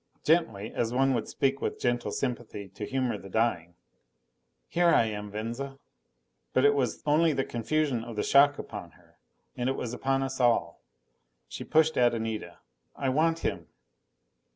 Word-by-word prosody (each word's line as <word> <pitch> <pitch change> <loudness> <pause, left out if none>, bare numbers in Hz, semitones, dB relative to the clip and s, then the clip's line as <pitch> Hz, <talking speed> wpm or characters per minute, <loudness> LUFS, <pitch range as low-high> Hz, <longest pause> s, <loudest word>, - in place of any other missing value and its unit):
Gently, 115 -11 +1
as 115 -1 -1
one 135 +2 +2
would 115 -3 -1
speak 135 0 0
with - - -2
gentle 120 -1 0
sympathy 120 -6 -4
to 100 +2 -7
humor 130 -5 -1
the 95 - -11
dying. 90 -6 0 0.9
"Here 175 0 +2
I 115 - +5
am, 105 -1 -4
Venza." 120 +6 -5 0.8
But 130 - +3
it 145 - +6
was 130 -5 -1
only 155 +2 +4
the 135 - 0
confusion 125 +1 -1
of 115 -1 -8
the 105 - -1
shock 145 +1 +5
upon - - -8
her. - - -25 0.4
And 125 +1 -1
it 135 - 0
was 120 -2 -4
upon 135 +2 0
us 135 0 -4
all. 115 -9 +2 0.7
She - - -7
pushed 160 0 +3
at 120 -1 +4
Anita. 110 -1 -4 0.4
"I 135 - -1
want 165 +4 +2
him." - - -2
125 Hz, 165 wpm, -28 LUFS, 115-140 Hz, 0.9 s, it